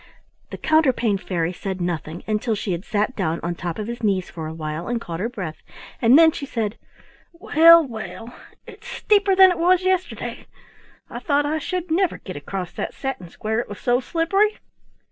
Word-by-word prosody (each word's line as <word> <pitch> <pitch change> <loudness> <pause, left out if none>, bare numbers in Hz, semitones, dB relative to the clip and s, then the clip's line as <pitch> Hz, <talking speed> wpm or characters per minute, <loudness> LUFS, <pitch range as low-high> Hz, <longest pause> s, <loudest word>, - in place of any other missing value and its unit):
The - - -7
Counterpane 260 -10 +2
Fairy 175 -2 -2
said 190 +1 -5
nothing 170 -2 -4
until 215 +1 -1
she 200 -1 -3
had 175 +1 -3
sat 210 +5 -1
down 165 -4 -1
on 170 +1 -1
top 170 -1 -5
of 215 - -4
his 235 +2 -6
knees 195 -4 0
for 160 -2 -6
a 160 - -6
while 155 +1 -5
and 240 -1 -1
caught 165 -7 -6
her 220 +5 -1
breath, 185 -10 -6 0.4
and 240 +4 +6
then 325 0 +7
she 280 - -6
said: 225 -4 -2 0.6
"Well, 335 -1 +6
well! 230 0 -8 0.3
It's 445 +2 -13
steeper 405 -5 +2
than 380 -1 +8
it 360 - -3
was 360 +2 +3
yesterday. 370 -1 -2 0.6
I - - -7
thought 290 -2 +1
I 310 +2 -1
should 360 +1 -4
never 365 +1 +1
get 185 - -9
across 180 +5 -5
that - - -5
satin 270 -11 -5
square, 220 +5 -3
it 240 - -4
was 205 - -8
so 245 0 +2
slippery." 375 - +1
230 Hz, 190 wpm, -22 LUFS, -, 0.6 s, than